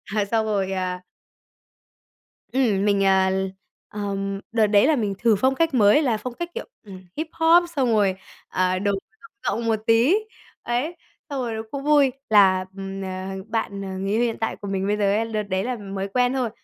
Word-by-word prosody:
à, 210 -2 +2
xong 220 +2 0
rồi, 195 -3 -1
à 185 -1 -3 1.5
Ừm, 215 -7 +2
mình, 200 -1 +2
à, 190 -1 +4 0.6
ờm, 195 -1 -3
đợt 225 -2 +3
đấy 205 +4 +4
là 315 - +4
mình 210 -6 -1
thử 230 -2 +4
phong 260 +7 +2
cách 330 +1 +1
mới 215 +3 +5
là 245 -7 +1
phong 250 +3 -6
cách, 345 +7 -5
kiểu, 475 - -5 0.2
ừm, 190 -3 -11
Hip-hop 325 +2 +3
xong 260 -4 +2
rồi, 200 -3 +3 0.3
à, 185 0 0
đồ 200 +1 +1
rộng 440 - -8 0.3
rộng 235 - -4
một 225 -1 +1
tí. 230 +10 +5 0.5
Ấy, 255 +9 -2 0.3
xong 280 -2 -3
rồi 235 -2 -3
nó 220 - -3
cũng 280 -1 -5
vui 290 -2 +4 0.2
là, 190 -3 +5
ừm, 195 0 -5
à, 190 +1 -5
bạn, 220 -3 -3
ờ, 195 - -5
người 195 +1 -2
yêu 220 +3 +2
hiện 235 -2 0
tại 225 - -1
của 205 - -9
mình 195 0 -1
bây 210 - +1
giờ 210 - -1
ấy, 225 +2 +1
đợt 215 0 0
đấy 190 -1 -2
là 250 +1 -2
mới 195 -2 -5
quen 250 +5 +1
thôi, 255 -3 0
210 Hz, 200 wpm, -23 LUFS, 195-250 Hz, 1.5 s, mới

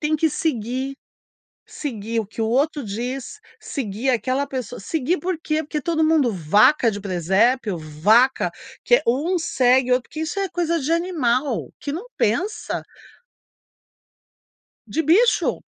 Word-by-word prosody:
têm 310 0 +1
que 320 +1 +2
seguir 265 -2 -2 0.7
seguir 230 -5 -4
o 215 - -6
que 225 +2 -5
o - - +1
outro 280 +4 +1
diz, 240 +5 -5 0.2
seguir 245 -1 -2
aquela 255 +3 0
pessoa 255 -5 -5
seguir 315 - -1
por 365 -2 -2
quê? 310 0 0
Porque 300 0 -3
todo 320 +1 0
mundo 310 -6 +3
vaca 210 - +4
de 205 -1 -6
presépio, 195 +3 +1
vaca, 205 - +3 0.3
que - - +6
é - - -2
um 310 +10 +1
segue 255 -5 +2
o - - +7
outro, 250 - -3
que 310 - -6
isso 320 +5 -3
é 390 - 0
coisa 335 -1 0
de 290 +5 -1
animal, 290 - 0
que 285 - -4
não 345 +8 -5
pensa. 360 - -1 2.0
De 320 - -1
bicho. 410 - +3
265 Hz, 150 wpm, -22 LUFS, 225-315 Hz, 2.0 s, o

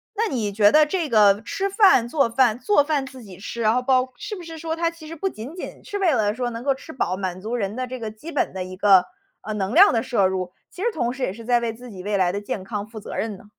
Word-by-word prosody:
那 450 +2 +1
你 220 -6 -1
觉 205 0 +5
得 305 0 +6
这 330 0 -2
个 210 -3 +5
吃 390 +11 -2
饭、 390 - +5
做 275 -1 +1
饭 235 -1 +2
做 410 -1 +3
饭 290 -2 0
自 260 -1 -11
己 190 -4 -12
吃， 235 +4 -6
然 215 0 +3
后 250 - +1
包 255 0 +1
是 415 +1 -6
不 365 - -9
是 325 -1 -8
说 325 0 -3
它 335 0 0
其 335 -2 -13
实 330 - -7
不 360 +5 -2
仅 255 +3 -9
仅 365 - -8
是 405 - -5
为 360 -5 +3
了 215 -3 +1
说 245 0 -2
能 230 +1 -6
够 275 0 +2
吃 320 +4 -11
饱， 185 -7 -1
满 185 -1 -4
足 225 +4 -3
人 205 -3 -2
的 255 0 -3
这 255 0 -6
个 220 -2 -5
基 260 +10 -10
本 285 - -1
的 190 -1 -3
一 185 0 -9
个， 195 -2 +6 0.4
呃， 215 - -5
能 200 +1 -2
量 385 +7 +8
的 225 -1 +1
摄 200 -7 +2
入， 185 -1 -3 0.2
其 370 - -8
实 - - +2
同 240 -5 -1
时 255 0 -5
也 185 - -1
是 230 +3 -11
在 240 0 +3
为 235 -1 -2
自 245 +2 -12
己 185 -3 -9
未 205 +1 -1
来 185 -2 +2
的 200 - -3
健 205 -1 -4
康 205 0 -5
负 220 0 -9
责 210 - -8
任 220 -1 -2
呢？ - - -17
235 Hz, 320 characters per minute, -23 LUFS, 205-300 Hz, 0.4 s, 量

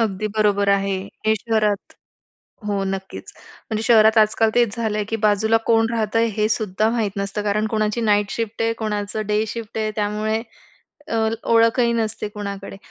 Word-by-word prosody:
अगदी 215 -2 -1
बरोबर 205 -1 +2
आहे. 195 -1 +2 0.3
हे 220 - +4
शहरात 215 -2 -1 0.8
हो 200 -1 0
नक्कीच. 195 0 -5 0.4
म्हणजे 220 -1 -2
शहरात 220 -1 +5
आजकाल 220 +1 +4
तेच 235 -3 +2
झालं 220 -2 -2
आहे 210 - -1
की 225 - 0
बाजूला 215 +2 +3
कोण 225 0 +3
राहतंय 225 +1 +1
हे 215 - +2
सुद्धा 215 0 0
माहीत 225 -4 -1
नसतं. 200 +1 -2
कारण 210 +1 0
कोणाची 215 +1 -1
नाईट 205 -2 +2
शिफ्ट 225 -1 -3
आहे 230 0 +1
कोणाचं 210 0 -2
डे 210 +1 +1
शिफ्ट 225 0 -6
आहे 215 -1 -1
त्यामुळे 215 +1 -1 0.7
अ, 225 - 0 0.3
ओळखही 230 +1 +4
नसते 220 -2 -2
कुणाकडे. 200 -1 -7
215 Hz, 165 wpm, -21 LUFS, 205-225 Hz, 0.8 s, शहरात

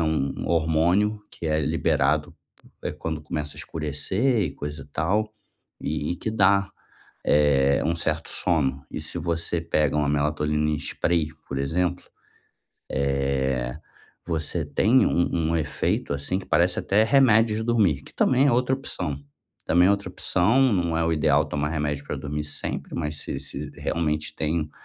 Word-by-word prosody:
é - - +2
um 80 -4 -1
hormônio 85 +6 +2
que 85 - -7
é 75 0 +1
liberado, 75 +1 +1 0.5
eh, - - -2
quando 80 +1 -4
começa 75 -1 -4
a - - -9
escurecer 80 - -1
e 80 - -1
coisa 75 0 -6
e - - -14
tal, 100 +9 -1 0.5
e 75 +2 -2
e - - -5
que 110 - -3
dá, 100 -2 +3 0.5
eh, 70 -2 +3
um 85 +2 0
certo 80 -1 -1
sono, 70 -6 0
e - - -5
se 75 +3 -4
você 85 0 -1
pega 75 -3 +1
uma 75 -1 +1
melatonina 75 +1 +1
em 75 - 0
spray, 80 -3 0 0.2
por 70 - -3
exemplo, 90 +6 -1 1.1
eh, 65 -2 -1 0.5
você 80 -3 -1
tem 125 +5 +3
um 85 -2 +1
um 85 - +1
efeito, 75 -1 -1
assim, 70 +7 -1
que - - -11
parece 90 +1 +2
até 105 +3 +3
remédio 115 -3 +4
de 110 - -2
dormir, 105 - +2
que - - -13
também 130 +2 +3
é - - +3
outra 125 +2 +2
opção. 90 - -4 0.5
Também 90 +1 +4
é - - +5
outra 100 0 0
opção, 120 +8 +3
não 85 -4 0
é 85 - +1
o 80 - +1
ideal 75 -1 +3
tomar 75 0 -2
remédio 75 -2 -2
pra - - -4
dormir 75 +1 -4
sempre, 75 - -4
mas 75 -2 -2
se - - -4
se - - -6
realmente 75 -1 -1
tem 80 +1 0
um 75 - -9
80 Hz, 170 wpm, -25 LUFS, 75-90 Hz, 1.1 s, é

